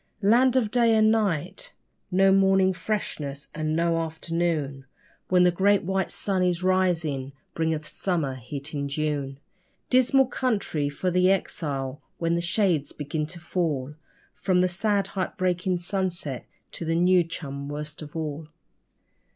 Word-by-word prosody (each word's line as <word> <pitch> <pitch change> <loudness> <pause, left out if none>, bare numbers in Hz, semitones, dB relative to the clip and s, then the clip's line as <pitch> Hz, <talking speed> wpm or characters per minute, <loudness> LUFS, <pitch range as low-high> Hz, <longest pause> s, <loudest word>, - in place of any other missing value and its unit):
Land 245 +5 +5
of 230 -5 +2
day 235 -1 +4
and 215 0 +5
night 195 -5 -1 0.4
no 190 +1 +4
morning 190 -1 +4
freshness, 155 -7 -4
and 155 0 -1
no 165 0 +2
afternoon, 160 -4 -2 0.4
When 180 -1 +4
the 180 - +5
great 200 +3 +3
white 190 +1 -1
sun 195 -2 -2
in 180 -1 +2
rising 165 -8 +1 0.2
bringeth 160 -2 -1
summer 165 -8 -1
heat 140 +4 -7
in 140 -1 -2
June. 140 -2 -2 0.5
Dismal 260 +1 +5
country 205 - -1
for 180 +6 -2
the 180 +1 +4
exile, 145 -7 -2 0.2
when 165 0 0
the 170 - +1
shades 170 -5 +1
begin 150 +1 -3
to 170 +2 -9
fall 155 -5 -2 0.4
From 185 -2 +1
the 185 - +3
sad 200 +2 0
heart 185 0 -3
breaking 180 -1 0
sunset, 175 -6 -2 0.2
to - - -6
the 165 0 0
new 180 +1 +4
chum 140 -4 -6
worst 150 +1 -6
of 150 0 -10
all. 155 -1 -4
170 Hz, 145 wpm, -26 LUFS, 150-190 Hz, 0.5 s, Land